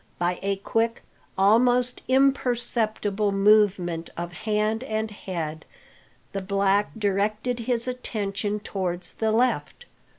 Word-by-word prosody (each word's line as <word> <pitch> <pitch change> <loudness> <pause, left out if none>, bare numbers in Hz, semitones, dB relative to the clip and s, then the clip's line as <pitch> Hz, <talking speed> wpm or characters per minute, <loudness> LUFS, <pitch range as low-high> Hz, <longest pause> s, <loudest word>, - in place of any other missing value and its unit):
By 175 0 -1
a 200 0 0
quick, 225 +4 -1 0.3
almost 245 +5 +3
imperceptible 240 -6 +1
movement 195 -4 +3
of 175 0 -4
hand 215 +3 -1
and 220 -3 -2
head, 165 -6 -5 0.7
the 195 - -2
black 200 +1 +1
directed 215 +4 0
his 235 +1 +1
attention 210 -4 -3
towards 180 -3 -3
the 220 -1 0
left. 250 - 0
210 Hz, 105 wpm, -25 LUFS, 195-230 Hz, 0.7 s, almost